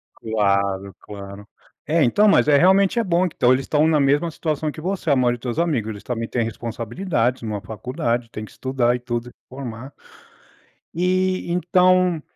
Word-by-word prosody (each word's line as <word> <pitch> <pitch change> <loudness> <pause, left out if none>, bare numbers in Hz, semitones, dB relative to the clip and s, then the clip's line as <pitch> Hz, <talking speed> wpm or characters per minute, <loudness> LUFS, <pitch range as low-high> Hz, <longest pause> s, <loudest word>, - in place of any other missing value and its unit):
Claro, 100 -3 -1
claro, 100 0 -10 0.4
é 160 +1 +2
então, 205 - +4
mas 200 - +4
é 145 -1 +5
realmente 190 +6 +4
é - - +1
bom, 180 -1 +1
que - - -21
então 125 +1 +4
eles 130 +1 -1
estão 155 +1 +2
na 155 -2 +3
mesma 145 +5 +2
situação 155 -1 -2
que 155 - -10
você, 185 -1 -3
a - - +5
maioria 120 -2 +2
dos - - -26
teus 120 +1 -3
amigos. 150 -11 0
Eles 100 -2 -9
também 115 -2 -3
têm 120 - -1
responsabilidades, 120 - -2
uma 105 -3 -4
faculdade, 120 - -3
tem 110 - -7
que 110 - -11
estudar 130 -2 0
e 125 - -4
tudo 120 -1 -4
e - - -16 0.2
formar 130 0 -8 1.0
E 185 +2 0
então 180 0 +3
130 Hz, 185 wpm, -21 LUFS, 115-170 Hz, 1.0 s, é